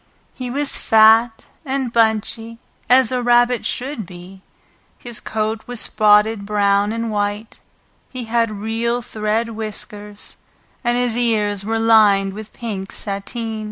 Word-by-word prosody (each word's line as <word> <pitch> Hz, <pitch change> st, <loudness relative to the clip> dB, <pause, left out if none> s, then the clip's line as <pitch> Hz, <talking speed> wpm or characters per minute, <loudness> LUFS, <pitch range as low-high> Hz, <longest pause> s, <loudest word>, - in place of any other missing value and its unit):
He 255 Hz, -1 st, -6 dB
was 280 Hz, +3 st, +1 dB
fat 225 Hz, +1 st, +4 dB, 0.2 s
and 265 Hz, -4 st, -3 dB
bunchy, 225 Hz, +1 st, 0 dB, 0.3 s
as 255 Hz, -1 st, +5 dB
a 250 Hz, -1 st, -1 dB
rabbit 240 Hz, 0 st, +3 dB
should 250 Hz, -, -4 dB
be; 180 Hz, +2 st, -12 dB, 0.6 s
his 240 Hz, -2 st, -6 dB
coat 220 Hz, 0 st, -3 dB
was 245 Hz, -2 st, -4 dB
spotted 210 Hz, -1 st, +3 dB
brown 200 Hz, 0 st, +1 dB
and 230 Hz, 0 st, -3 dB
white, 205 Hz, +1 st, -3 dB, 0.5 s
he 255 Hz, -2 st, -6 dB
had 230 Hz, 0 st, 0 dB
real 225 Hz, +3 st, -2 dB
thread 220 Hz, +1 st, -2 dB
whiskers, 210 Hz, -1 st, -6 dB, 0.5 s
and 240 Hz, 0 st, +1 dB
his 245 Hz, -2 st, +1 dB
ears 210 Hz, -4 st, 0 dB
were 225 Hz, +2 st, -1 dB
lined 210 Hz, -4 st, +4 dB
with 215 Hz, +1 st, -9 dB
pink 205 Hz, -5 st, -6 dB
sateen. 220 Hz, +3 st, -4 dB
225 Hz, 130 wpm, -19 LUFS, 210-240 Hz, 0.6 s, as